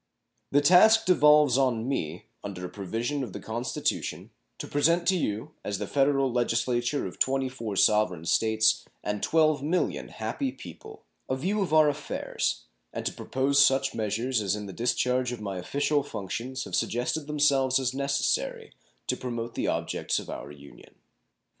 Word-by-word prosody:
The 145 - +3
task 220 +8 +6
devolves 150 -6 +5
on 125 -3 +1
me, 85 - -3 0.2
under 95 -3 -6
a - - -6
provision 115 +9 -3
of 110 -8 -7
the - - -6
Constitution, 115 +3 -3 0.3
to - - -6
present 165 +4 +1
to 190 - +3
you, 135 - -2
as 100 -1 -3
the - - -3
Federal 135 -1 +2
Legislature 120 +2 0
of - - -8
24 130 -5 -1
sovereign 95 -5 +2
States 110 +3 +2 0.2
and 105 0 -3
12,000,000 155 +1 +1
happy 275 -2 -3
people, 435 - -12 0.3
a 130 - +1
view 190 +10 -1
of 190 - -1
our 155 -1 +6
affairs, 145 0 -2 0.3
and - - -5
to - - -1
propose 140 +2 +2
such 135 0 +2
measures 115 +3 -1
as 100 -1 0
in 105 -1 -6
the 95 - -8
discharge 125 +1 0
of 120 - -5
my 100 -3 -4
official 145 +9 0
functions 130 +2 -5
have - - -10
suggested 125 +6 -1
themselves 140 -3 +2
as 130 -1 -1
necessary 450 - -1 0.3
to - - 0
promote 120 -2 -5
the - - -2
objects - - -1
of - - -5
our 70 - -7
Union. 70 -1 -15
130 Hz, 160 wpm, -27 LUFS, 110-145 Hz, 0.3 s, task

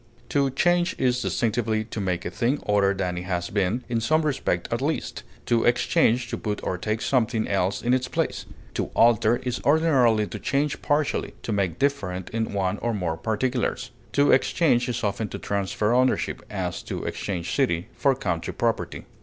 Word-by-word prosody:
To 140 -1 +2
change 175 +6 +2
is 125 -1 +1
distinctively 110 -1 0
to 110 -1 -5
make 90 -2 -2
a - - -3
thing 120 +8 0
other 100 -1 +3
than 90 -2 -2
it 90 - -7
has 90 -2 -2
been, 100 +5 0
in 115 -2 -1
some 155 +8 +2
respect 130 - -1
at 115 - -1
least; 155 +4 -2 0.2
to 115 -1 +2
exchange 120 0 +3
to - - -4
put 105 -1 -2
or - - -1
take 110 +4 -2
something 115 -4 +1
else 95 0 0
in 120 +1 +2
its 130 0 +1
place; - - -2 0.3
to - - -1
alter 115 0 +5
is 125 -1 -2
ordinarily 135 -8 +4
to - - -7
change 140 +2 -1
partially, 145 0 0
to - - -3
make 95 -5 0
different 95 -11 -1
in 110 0 -2
one 95 -2 -1
or 120 -1 -1
more 85 -5 -1
particulars. 120 +5 -1 0.2
To 145 0 +4
exchange 130 -3 +3
is 120 - -3
often 105 +1 -1
to - - -5
transfer 100 +2 -1
ownership; 130 +1 +1
as, - - -3
to - - -5
exchange 90 -4 -3
city 95 -10 +1
for 135 -2 +2
country 85 -9 -3
property. - - -1
115 Hz, 180 wpm, -25 LUFS, 100-130 Hz, 0.3 s, alter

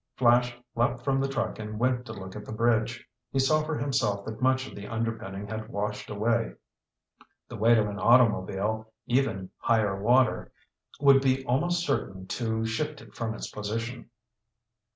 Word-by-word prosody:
Flash 120 0 +3 0.2
leaped 120 +1 0
from 135 0 +1
the 135 - +1
truck 135 -4 -2
and 105 0 -5
went 125 +1 0
to 110 - -6
look 95 -3 -8
at 105 - -6
the - - -9
bridge. 115 +1 +1 0.2
He - - -2
saw 155 +4 +3
for 155 0 -2
himself 105 -8 0
that 110 +1 -7
much 130 +1 +2
of - - -10
the 100 0 -8
underpinning 110 -3 -3
had 110 +1 -6
washed 105 -1 -3
away. 115 +2 0 0.9
The - - -8
weight 115 +2 +5
of 105 -1 +2
an 100 0 -5
automobile, 110 -2 +3
even 120 -7 0
higher 105 -4 +1
water, 125 +4 +3 0.5
would 140 -1 +6
be 135 0 +1
almost 170 +8 +1
certain 95 - -2
to 110 -2 -1
shift 150 +7 -2
it - - -15
from 110 -1 -3
its - - -6
position. 115 +3 -4
115 Hz, 170 wpm, -28 LUFS, 105-130 Hz, 0.9 s, would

